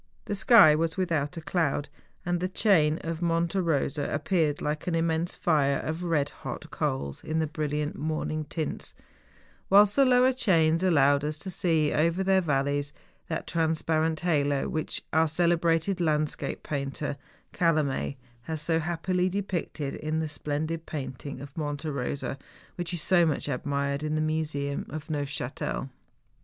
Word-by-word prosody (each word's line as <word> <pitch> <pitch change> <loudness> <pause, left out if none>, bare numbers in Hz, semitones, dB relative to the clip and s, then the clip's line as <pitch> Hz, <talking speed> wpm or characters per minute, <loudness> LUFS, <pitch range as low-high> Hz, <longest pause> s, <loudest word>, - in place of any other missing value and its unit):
The - - -3
sky 200 -5 +7
was 160 +2 0
without 165 -4 -1
a - - -4
cloud, 155 -4 0 0.4
and 175 0 0
the 185 +1 -1
chain 165 -6 +3
of 165 0 -4
Monte 170 +2 +1
Eosa 150 -4 0
appeared 150 0 +1
like 150 +2 -3
an 175 - +1
immense 165 +1 0
fire 150 -7 +2
of 160 +2 -4
red 155 -5 +1
hot - - -6
coals 70 +1 -2
in 155 - -2
the 160 - +2
brilliant 150 -1 -2
morning 155 0 -2
tints, 155 +1 -4 0.7
whilst 205 +1 +6
the 275 - +6
lower 255 0 +5
chains 165 -9 +3
allowed 145 -6 +4
us 150 +1 -2
to 190 +5 -5
see 160 -4 +1
over 170 +4 +2
their 190 0 +3
valleys 145 -2 0 0.3
that 160 - -3
transparent 160 -1 0
halo 145 -5 +1
which 155 -1 -2
our 160 +1 +4
celebrated 170 +2 +1
landscape 155 -2 -1
painter, 140 0 -3 0.4
Calame, 150 -5 +1 0.2
has 160 +5 -4
so 160 +2 +1
happily 180 +3 0
depicted 180 -7 -3
in 155 +1 -3
the 160 0 -1
splendid 155 +2 -3
painting 135 -1 -6
of 140 0 -10
Monte 145 -1 -3
Eosa, 140 -1 -3 0.3
which 175 -2 -3
is 175 -3 -1
so 175 -2 +4
much 155 -4 0
admired 140 +2 -1
in 155 0 -1
the - - +1
museum 155 -3 -2
of 155 +2 -6
Neufchatel. 140 -2 -3
155 Hz, 150 wpm, -28 LUFS, 145-170 Hz, 0.7 s, sky